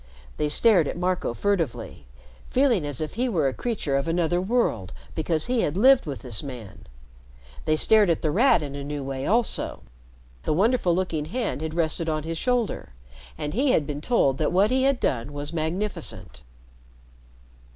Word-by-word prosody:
They 150 Hz, -, 0 dB
stared 180 Hz, 0 st, +4 dB
at -, -, -4 dB
Marco 180 Hz, -4 st, -1 dB
furtively, 160 Hz, -, -2 dB, 0.4 s
feeling 245 Hz, -, +2 dB
as 145 Hz, -1 st, -5 dB
if 155 Hz, -, -4 dB
he 250 Hz, +4 st, -1 dB
were 160 Hz, -, +1 dB
a 130 Hz, -, -1 dB
creature 200 Hz, -, -2 dB
of 140 Hz, -, -2 dB
another 175 Hz, +1 st, +1 dB
world 190 Hz, -, 0 dB, 0.2 s
because 160 Hz, 0 st, -1 dB
he 245 Hz, -1 st, +1 dB
had 150 Hz, +4 st, -1 dB
lived 260 Hz, -1 st, +5 dB
with 140 Hz, -3 st, -5 dB
this 120 Hz, -5 st, -1 dB
man. 125 Hz, -8 st, -9 dB, 0.8 s
They 155 Hz, -, +2 dB
stared 210 Hz, +4 st, +5 dB
at 170 Hz, -, 0 dB
The 155 Hz, -, +1 dB
Rat 215 Hz, -, +4 dB
in 140 Hz, -1 st, -6 dB
a 140 Hz, 0 st, -6 dB
new 145 Hz, 0 st, -4 dB
way 135 Hz, 0 st, -4 dB
also. 230 Hz, +3 st, 0 dB, 0.6 s
The -, -, -1 dB
wonderful 200 Hz, -2 st, +2 dB
looking 170 Hz, -5 st, -1 dB
hand 225 Hz, -, -3 dB
had 160 Hz, 0 st, -4 dB
rested 165 Hz, 0 st, 0 dB
on 155 Hz, -1 st, -1 dB
his 165 Hz, +1 st, -4 dB
shoulder, 245 Hz, -, -1 dB, 0.4 s
and 150 Hz, 0 st, -4 dB
he 260 Hz, +5 st, +2 dB
had 150 Hz, -, +2 dB
been 145 Hz, 0 st, -5 dB
told 145 Hz, -, +1 dB
that 155 Hz, -, +1 dB
what 195 Hz, +5 st, +3 dB
he 260 Hz, +1 st, +2 dB
had 275 Hz, -2 st, +2 dB
done 125 Hz, +3 st, -1 dB
was 145 Hz, +2 st, -6 dB
magnificent. 170 Hz, +6 st, -4 dB
165 Hz, 180 wpm, -25 LUFS, 145-215 Hz, 0.8 s, lived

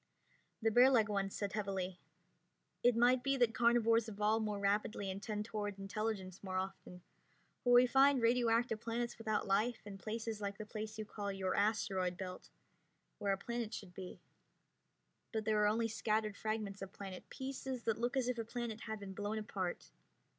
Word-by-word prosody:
The 225 Hz, -, +4 dB
bearlike 245 Hz, -2 st, +6 dB
one 195 Hz, -1 st, 0 dB
said 200 Hz, 0 st, -3 dB
heavily, 195 Hz, -3 st, -2 dB, 0.8 s
"It 245 Hz, -1 st, +5 dB
might 245 Hz, +2 st, +5 dB
be 275 Hz, +1 st, +1 dB
that 240 Hz, -3 st, +3 dB
carnivores 230 Hz, -1 st, +4 dB
evolve 210 Hz, +1 st, +1 dB
more 210 Hz, -1 st, -1 dB
rapidly 200 Hz, 0 st, 0 dB
and 195 Hz, +1 st, -6 dB
tend 210 Hz, 0 st, -3 dB
toward 210 Hz, -3 st, -3 dB
intelligence 195 Hz, -1 st, -3 dB
more 185 Hz, -1 st, -2 dB
often, 185 Hz, -1 st, -5 dB, 0.6 s
for 245 Hz, -, +4 dB
we 245 Hz, +1 st, +9 dB
find 270 Hz, +2 st, +5 dB
radioactive 230 Hz, -1 st, +2 dB
planets 235 Hz, +1 st, -2 dB
without 215 Hz, -2 st, 0 dB
life, 215 Hz, +4 st, +1 dB
and 200 Hz, -1 st, -8 dB
places 220 Hz, 0 st, -4 dB
like 200 Hz, -1 st, -3 dB
the 215 Hz, -, -6 dB
place 215 Hz, 0 st, -6 dB
you 215 Hz, -, -4 dB
call 205 Hz, -1 st, -4 dB
your 190 Hz, -1 st, -1 dB
asteroid 200 Hz, -4 st, +1 dB
belt, 185 Hz, -1 st, -7 dB, 0.7 s
where 200 Hz, -1 st, +1 dB
a -, -, -1 dB
planet 235 Hz, +1 st, -3 dB
should 185 Hz, -3 st, -8 dB
be 185 Hz, 0 st, -8 dB, 1.1 s
but 220 Hz, -2 st, -2 dB
there 215 Hz, -1 st, +3 dB
are 210 Hz, -, +5 dB
only 225 Hz, +2 st, +2 dB
scattered 215 Hz, -1 st, 0 dB
fragments 215 Hz, -2 st, -3 dB
of 195 Hz, -1 st, -6 dB
planet, 195 Hz, -2 st, -8 dB
pieces 265 Hz, -2 st, -5 dB
that 225 Hz, -1 st, 0 dB
look 245 Hz, +3 st, 0 dB
as 255 Hz, -2 st, +1 dB
if 250 Hz, -2 st, -1 dB
a -, -, 0 dB
planet 230 Hz, -1 st, -4 dB
had 220 Hz, -1 st, -4 dB
been 195 Hz, -1 st, -7 dB
blown 205 Hz, +2 st, -2 dB
apart. 195 Hz, -4 st, -4 dB
215 Hz, 175 wpm, -36 LUFS, 200-230 Hz, 1.1 s, we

